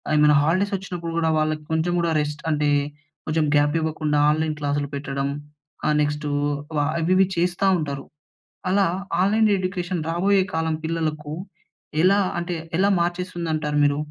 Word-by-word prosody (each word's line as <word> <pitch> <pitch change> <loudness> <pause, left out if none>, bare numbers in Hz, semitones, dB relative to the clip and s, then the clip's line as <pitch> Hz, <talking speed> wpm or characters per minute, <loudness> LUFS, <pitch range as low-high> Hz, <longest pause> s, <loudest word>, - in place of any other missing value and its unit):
ఏమైనా 150 0 +5
హాలిడేస్ 185 +6 +1
వచ్చినప్పుడు 175 -3 -6
గూడా 160 -1 +2
వాళ్ళకి 155 0 -1
కొంచెం 160 +2 +1
గూడా 170 -1 +1
రెస్ట్ 150 0 -4
అంటే 150 -1 +1 0.6
కొంచెం 155 0 +1
గ్యాప్ 145 +1 +3
ఇవ్వకుండా 155 -2 0
ఆన్లైన్ 155 0 0
క్లాస్‌లు 145 -1 -1
పెట్టడం. 140 0 -2 0.6
ఆహ్, 150 - +2
నెక్స్టూ 150 0 -1 0.5
వా 145 - +3 0.2
అవి 165 +2 0
ఇవి 190 0 +5
చేస్తా 175 +2 +1
ఉంటారు. 140 -3 -4 0.6
అలా 195 +1 +3 0.4
ఆన్లైన్ 215 +3 +3
ఎడ్యుకేషన్ 185 -2 -2
రాబోయే 190 +3 +3
కాలం 160 -1 0
పిల్లలకు 155 -2 -2 0.7
ఎలా 195 +3 +5 0.2
అంటే 175 +1 -2 0.2
ఎలా 195 +2 +3
మార్చేస్తుందంటారు 170 -4 -2
మీరు? 145 0 +3
160 Hz, 140 wpm, -23 LUFS, 150-180 Hz, 0.7 s, ఏమైనా